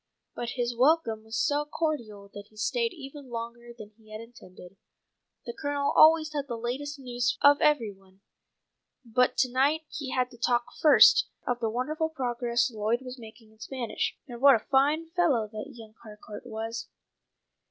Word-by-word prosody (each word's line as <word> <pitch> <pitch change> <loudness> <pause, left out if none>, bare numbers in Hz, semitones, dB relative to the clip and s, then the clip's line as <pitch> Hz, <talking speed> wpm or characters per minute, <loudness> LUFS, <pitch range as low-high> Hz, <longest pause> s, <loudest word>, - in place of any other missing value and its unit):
But 240 0 -4
his 240 -1 -1
welcome 250 -4 +2
was 220 0 -5
so 290 +5 +1
cordial 280 -10 -4
that 205 0 -10
he 215 - -23
stayed 465 - 0
even 280 -4 -11
longer 235 0 -7
than 215 -3 -12
he 215 -1 -21
had 215 - -7
intended. 195 -5 -14 0.7
The 235 - -5
Colonel 285 +1 -2
always 310 -1 +6
had 285 -1 -3
the 235 -3 -4
latest 270 +5 -4
news 245 -3 -2
of 285 0 +6
every 290 -8 +2
one, 195 0 -22 0.8
but 250 +2 +1
to 255 - +2
night 280 +5 +2
he 285 -3 -5
had 255 -1 -1
to 240 - -16
talk 240 0 +1 0.2
first 305 -2 +7 0.2
of 245 -1 -1
the 225 -2 -1
wonderful 305 +8 -2
progress 240 -4 -1
Lloyd 220 +2 -1
was 255 0 -9
making 220 -1 -14
in 220 - -25
Spanish, 245 0 -4
and 240 -2 -9
what 280 -1 +8
a 220 - -4
fine 300 +5 +2
fellow 305 -11 +1
that 215 +6 -6
young 220 -2 -13
Harcourt 210 +1 -11
was. 225 0 -5
245 Hz, 175 wpm, -27 LUFS, 225-285 Hz, 0.8 s, what